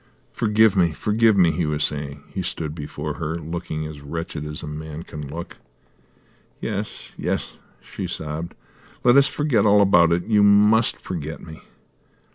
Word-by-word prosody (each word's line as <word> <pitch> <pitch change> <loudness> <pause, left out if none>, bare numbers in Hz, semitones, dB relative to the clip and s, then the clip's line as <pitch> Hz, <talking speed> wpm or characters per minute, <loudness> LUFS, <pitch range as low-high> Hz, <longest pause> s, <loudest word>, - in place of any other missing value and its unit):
"Forgive 110 -2 +3
me, 85 -4 +3
forgive 110 +3 +2
me," 85 -3 +5
he 80 0 -1
was 75 0 0
saying. 70 -1 -3
He - - -2
stood 75 -2 -3
before 75 -1 -5
her, 80 0 -2
looking 80 -1 -5
as 75 -2 -8
wretched 75 0 -5
as 75 0 -6
a - - -6
man 75 +1 -6
can 75 -3 -8
look. 85 +5 -7 1.0
"Yes, - - -3
yes," - - -2 0.2
she - - -6
sobbed. 80 +2 -5 0.5
"Let 120 0 +6
us 140 0 +6
forget 145 -6 +1
all 105 -1 +5
about 90 -4 +5
it. 85 +1 +1
You 105 -2 +3
must 105 +3 +5
forget 80 -3 -6
me." 80 -1 -11
85 Hz, 160 wpm, -23 LUFS, 75-105 Hz, 1.0 s, Let